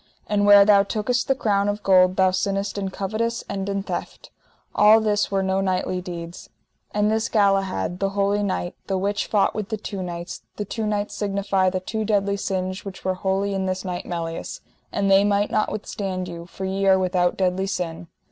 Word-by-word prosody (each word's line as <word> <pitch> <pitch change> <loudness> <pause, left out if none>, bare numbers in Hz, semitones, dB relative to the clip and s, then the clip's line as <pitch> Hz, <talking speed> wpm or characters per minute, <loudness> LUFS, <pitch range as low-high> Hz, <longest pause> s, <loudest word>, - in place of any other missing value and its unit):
And 205 -1 +1
where 205 -1 +9
thou 205 -1 +6
tookest 220 +4 -1
the 270 - +2
crown 205 -4 +1
of 205 +1 -3
gold 185 -1 +5
thou 190 -1 +4
sinnest 195 +2 -1
in 195 -1 -2
covetise 220 +5 -2
and 195 0 -3
in 200 0 -2
theft: - - -6 0.4
all 215 +1 +6
this 210 -2 +1
were 195 -1 0
no 190 0 +1
knightly 185 -1 -1
deeds. 170 -1 -8 0.4
And 210 +1 +1
this 220 +1 0
Galahad, 195 - +1
the 195 - +1
holy 200 +1 +1
knight, 185 -3 -2
the 195 - 0
which 200 +2 -1
fought 205 -2 +2
with 215 -2 -4
the 220 - -2
two 200 -2 -6
knights, 175 0 -6
the 210 - -4
two 220 +2 -3
knights 205 -1 -2
signify 195 -2 0
the 185 0 -2
two 220 +3 -3
deadly 200 -2 +1
sins 185 -1 -3
which 195 -2 -9
were 185 - +1
wholly 195 +2 -1
in 190 -1 -1
this 185 0 -3
knight 180 -1 -4
Melias; 165 -1 -5 0.3
and 200 -1 0
they 195 +1 +6
might 205 0 +1
not 215 - +1
withstand 190 -3 -4
you, 170 -1 -8
for 190 +2 -6
ye 195 +1 -1
are 190 0 +6
without 180 -1 +1
deadly 190 0 0
sin. 175 -3 -4
195 Hz, 200 wpm, -23 LUFS, 185-205 Hz, 0.4 s, where